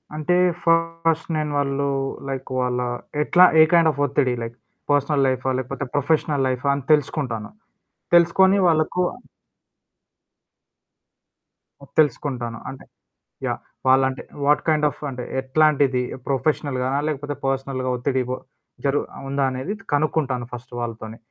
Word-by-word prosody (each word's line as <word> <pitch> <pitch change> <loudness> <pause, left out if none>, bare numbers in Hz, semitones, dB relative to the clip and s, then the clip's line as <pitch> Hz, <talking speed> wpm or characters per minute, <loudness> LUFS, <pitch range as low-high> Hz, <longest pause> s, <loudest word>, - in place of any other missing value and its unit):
అంటే, 155 +3 +1 0.3
ఫస్ట్ 165 -1 +1
నేను 150 -1 -2
వాళ్ళు 140 0 0 0.4
లైక్ 135 -1 -4
వాళ్ళా 125 0 -1 0.4
ఎట్లా? 180 +4 +6 0.2
ఏ - - +10
కైండ్ 165 -2 +6
ఆఫ్ 140 - -10
ఒత్తిడి? 130 -2 +1
Like, 115 +1 -7 0.4
personal 145 0 +2
లైఫా? 130 0 0
లేపోతే, 130 +1 -4
ప్రొఫెషనల్ 145 -1 +1
లైఫా? 130 +2 -2
అని 140 - -5
తెలుసుకుంటాను. 130 -7 0 0.7
తెలుసుకొని 190 +3 +5
వాళ్ళకు 160 +2 +1 2.8
హ్మ్. - - -16
తెలుసుకుంటాను. 125 -6 0
అంటే, 135 - -10 0.6
యాహ్! - - -2 0.3
వాళ్ళంటే 130 0 +3 0.2
వాట్ 150 +1 +3
కైండ్ 155 -1 +3
ఆఫ్ - - -13
అంటే 125 -1 -6 0.2
ఎట్లాంటిది? 135 -1 +2 0.3
ప్రొఫెషనల్‌గానా? 135 -1 0
లేపోతే 145 -1 -4
పర్సనల్‌గా 135 -1 -2
ఒత్తిడిబో? 130 0 -1 0.5
జరు 140 +1 +2 0.2
ఆహ్, - - -9
ఉందా 140 0 0
అనేది 130 +10 -4 0.2
కనుక్కుంటాను 145 -5 0
ఫస్ట్ 125 +1 -9
వాళ్ళతోని. 115 -1 -6
140 Hz, 120 wpm, -22 LUFS, 130-155 Hz, 2.8 s, ఏ